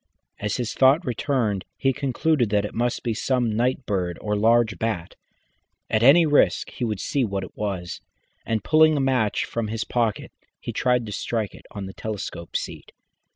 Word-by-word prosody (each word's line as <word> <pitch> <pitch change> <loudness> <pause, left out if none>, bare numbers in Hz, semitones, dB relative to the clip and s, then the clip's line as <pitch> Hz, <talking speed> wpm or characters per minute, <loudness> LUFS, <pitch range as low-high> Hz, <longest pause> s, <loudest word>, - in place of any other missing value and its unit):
As 105 0 -2
his 120 -3 -2
thought 135 +7 +4
returned 120 -6 -1
he 135 -1 +1
concluded 135 -1 +1
that 105 0 +1
it - - -6
must 120 +1 -1
be 115 - 0
some 120 -1 0
night 125 +3 0
bird 90 -4 -1
or 105 0 -2
large 110 -2 +3
bat. 105 -7 -2 0.8
At 110 - +2
any 145 +8 +7
risk 145 -2 +2
he - - -6
would 110 -4 -1
see 140 +5 0
what 100 -4 -2
it 95 - -10
was, 95 -4 -4 0.4
and 110 -3 -2
pulling 155 +5 +5
a - - +1
match 130 -6 +1
from 115 -2 -3
his 110 +1 -2
pocket, 115 -4 -1 0.3
he - - -6
tried 125 -2 +1
to 105 - -7
strike 110 0 -2
it - - -15
on 100 -2 -6
the 95 - -8
telescope 100 -5 -6
seat. - - -8
115 Hz, 185 wpm, -24 LUFS, 105-130 Hz, 0.8 s, any